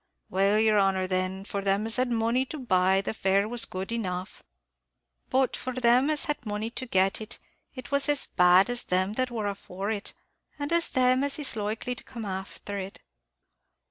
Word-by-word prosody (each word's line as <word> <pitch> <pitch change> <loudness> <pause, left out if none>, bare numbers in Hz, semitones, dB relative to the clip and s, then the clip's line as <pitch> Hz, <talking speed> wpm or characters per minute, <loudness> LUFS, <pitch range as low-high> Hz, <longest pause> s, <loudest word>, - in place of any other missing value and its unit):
"Well, 195 +2 +3
yer 215 -1 +4
honor, 190 -1 +2
then, 185 +1 -2
for 200 -1 -3
them 195 +2 +1
as 225 +2 +3
had 255 0 +1
money 230 +2 +1
to 305 - -7
buy, 190 -6 +2
the 200 - -4
fair 195 -1 +1
was 235 0 -2
good 190 +1 -6
enough; 190 -4 -4 0.9
but 260 -1 +2
for 255 - -5
them 250 +2 +3
as 305 -1 +1
had 295 - -3
money 215 +1 -3
to 255 +1 -6
get, 190 -1 +2
it 240 +3 -11
was 280 +1 +2
as 290 -1 +3
bad 180 +1 +5
as 245 0 +2
them 185 +2 0
that 255 +2 -1
wor 225 -3 -3
afore 200 0 -4
it, 205 -2 -5 0.4
and 290 +3 -3
as 340 0 +3
them 255 +1 +3
as 285 0 -2
is 290 -5 0
likely 220 +3 -2
to 245 - -9
come 230 -3 -8
afther 195 +1 -5
it." 195 +1 -7
215 Hz, 190 wpm, -27 LUFS, 195-250 Hz, 0.9 s, bad